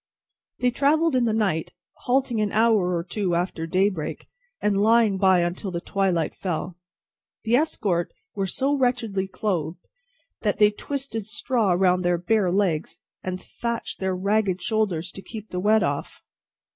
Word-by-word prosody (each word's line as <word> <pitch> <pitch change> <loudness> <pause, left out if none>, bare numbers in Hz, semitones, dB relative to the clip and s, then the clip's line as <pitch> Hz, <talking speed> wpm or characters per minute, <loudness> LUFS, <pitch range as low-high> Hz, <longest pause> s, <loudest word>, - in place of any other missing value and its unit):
They 250 0 +3
travelled 300 +4 +2
in 250 -2 +3
the 225 - +2
night, 195 -8 0 0.3
halting 250 -3 +2
an 210 -1 0
hour 215 -5 +3
or 170 - -2
two 185 0 -1
after 170 -2 -2
daybreak, 185 -2 -1 0.3
and 200 -1 +1
lying 220 -2 +4
by 190 -2 +5
until 175 +3 -2
the 170 -2 -3
twilight 180 -4 0
fell. 175 -1 -4 0.7
The 230 +2 +3
escort 205 - 0 0.2
were 195 -1 -1
so 270 +8 0
wretchedly 245 -8 0
clothed, 180 -5 -3 0.5
that 210 -2 0
they 210 0 +5
twisted 260 -2 -5
straw 220 -3 +1
round 180 0 +3
their 175 0 +2
bare 185 +1 +1
legs, 180 -5 0 0.2
and 185 0 -4
thatched 235 +3 -5
their 190 -1 -1
ragged 200 0 +1
shoulders 185 -4 -1
to 195 - -9
keep 215 +1 -9
the 180 - -2
wet 215 +3 +3
off. - - -3
200 Hz, 155 wpm, -24 LUFS, 180-225 Hz, 0.7 s, by